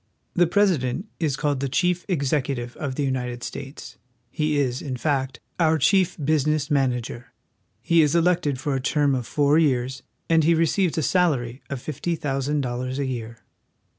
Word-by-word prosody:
The 175 -1 +3
Pres 200 +1 +3
ident 130 +7 -3 0.2
is 155 -5 0
called 145 -3 0
theChief 175 +7 0
Execu 140 -5 0
tive 120 0 -6
of 135 -3 -4
the 145 - -1
United 125 -2 -2
States. 140 +1 -8 0.3
He 150 -1 0
is, 130 -3 0
in 130 -3 -4
fact, 135 -2 -1 0.2
our 160 -1 +3
chief 180 +4 +3
business 150 0 +1
manager. 125 -3 -1 0.5
He 170 -1 +4
is 150 +1 +2
elected 170 -5 +2
for 145 +1 -2
a 135 - -1
term 145 +1 +2
of 125 -3 -2
four 145 +2 +3
years, 130 -4 0 0.3
and 165 -1 +4
he 165 +2 +4
receives 165 +2 +1
a 160 - +1
salary 140 -10 +1
of 140 - -4
fifty 160 +3 -2
thousand 145 0 -1
dollars 130 +1 -3
a 140 - -1
year. 115 -3 -6
145 Hz, 170 wpm, -24 LUFS, 130-160 Hz, 0.5 s, He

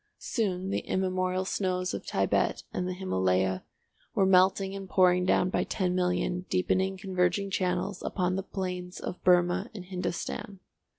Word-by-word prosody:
Soon 190 -5 -2
the - - +1
immemorial 185 0 -1
snows 185 -1 -1
of - - -4
Thibet - - 0
and 180 - -1
the 185 - -2
Himalaya 95 - +1 0.5
were 195 - +4
melting 190 +1 +4
and 195 -1 -7
pouring 180 -1 +4
down 180 0 +3
by - - +1
ten 185 -3 -1
million 180 0 0
deepening 190 +1 +1
converging 190 +1 0
channels 185 +1 -1
upon 185 -1 -1
the 195 - -1
plains 180 -2 -5
of 180 - -6
Burmah 180 +1 +3
and 185 -3 -7
Hindostan. 185 +2 -4
185 Hz, 145 wpm, -29 LUFS, 180-190 Hz, 0.5 s, were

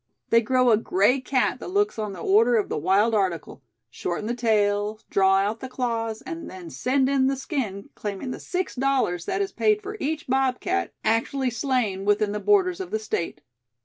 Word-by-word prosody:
They 230 - +6
grow 255 +1 +3
a 215 - +5
gray 210 +4 +2
cat 260 -1 0
that - - -7
looks 405 - 0
on 210 -2 -3
the 180 - -8
order 225 +5 +4
of 215 - +1
the - - -2
wild 195 +8 +3
article 185 -9 -1 0.3
shorten 175 +9 -4
the 235 - -1
tail, 210 -2 +1
draw 195 0 +4
out 205 +3 0
the 260 - -7
claws, 230 -3 -2
and 335 -2 -7
then 180 -3 -9
send 260 - +1
in 270 -1 +2
the 270 - +1
skin, 250 - -4
claiming 205 +4 -5
the - - -6
six 370 0 -3
dollars 255 -10 0
that 390 +2 0
is 390 - -5
paid 425 -1 +2
for 420 +1 -7
each 315 +2 -2
bobcat 270 +9 0
actually 245 +4 +1
slain 230 -6 -1
within 205 +1 +2
the 210 - -3
borders 380 - +2
of 380 - -5
the 220 - -1
State." 170 -8 -3
230 Hz, 195 wpm, -25 LUFS, 205-275 Hz, 0.3 s, They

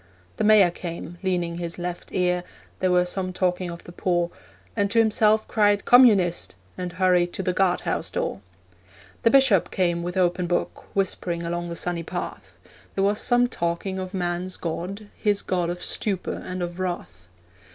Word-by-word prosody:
The - - 0
mayor 210 -4 +6
came, 170 0 -7
leaning 175 -3 -1
his 170 -1 -4
left 175 0 -5
ear 180 -1 +1 0.4
There 185 - +2
were 180 0 +4
some 185 +1 -2
talking 180 0 -1
of 170 0 -8
the - - -11
poor 175 -1 0 0.4
And 200 -2 +1
to 230 - -1
himself 220 -1 +4
cried, 205 -2 +2
'Communist!' 205 - +5 0.2
And 180 -1 -5
hurried 180 -1 +2
to 190 - -3
the 180 0 0
guardhouse 185 -1 0
door. 100 - -3 0.8
The 230 - +4
bishop 260 -8 +4
came 175 -2 0
with 175 +2 -4
open 180 -1 +1
book, 175 0 -2
Whispering 180 -3 -1
along 175 +1 -3
the 170 - -4
sunny 175 0 -2
path; 175 +2 -6 0.4
There 195 - +1
was 205 +1 +2
some 245 0 +4
talking 180 -1 -2
of 185 -1 -5
man's 180 0 -2
God, 180 +5 -4
His 205 -2 +1
God 180 -2 0
of 175 0 -4
stupor 195 -4 -2
and 185 0 -4
of 175 +1 -5
wrath. 175 - -4
180 Hz, 170 wpm, -24 LUFS, 175-195 Hz, 0.8 s, mayor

